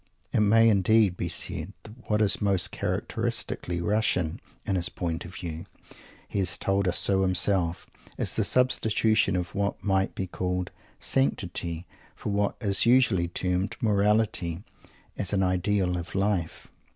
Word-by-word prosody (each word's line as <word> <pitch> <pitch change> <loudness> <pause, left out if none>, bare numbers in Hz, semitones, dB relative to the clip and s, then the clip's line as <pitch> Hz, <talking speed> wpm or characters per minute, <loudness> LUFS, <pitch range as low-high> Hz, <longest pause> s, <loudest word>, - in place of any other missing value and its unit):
It - - +2
may, 115 +2 +5
indeed, 105 -1 +4
be - - -3
said 85 +6 -2
that 115 +3 -15
what 105 0 +3
is 100 -1 +1
most 100 -3 +2
characteristically 85 -1 -2
Russian 95 -4 0 0.2
in 95 - 0
his 90 -1 0
point 85 -1 -4
of 90 +1 -10
view 85 -2 -6 0.6
he 100 - -3
has 90 -3 +1
told 100 0 0
us 90 - +1
so 95 -1 +3
himself 90 -2 +2 0.3
is - - -1
the - - +2
substitution 110 -5 +2
of 90 -1 -3
what 100 0 -2
might 95 -1 0
be 95 - -2
called 90 0 -3 0.3
"sanctity" 80 +5 0 0.3
for - - -5
what 100 0 0
is 100 0 +1
usually 115 -8 +4
termed 90 +2 -2
"morality," 105 -5 +1 0.6
as 100 -1 -2
an 95 -1 +2
ideal 95 0 +1
of 85 +2 -8
life. 95 -4 -2
95 Hz, 150 wpm, -27 LUFS, 90-105 Hz, 0.6 s, may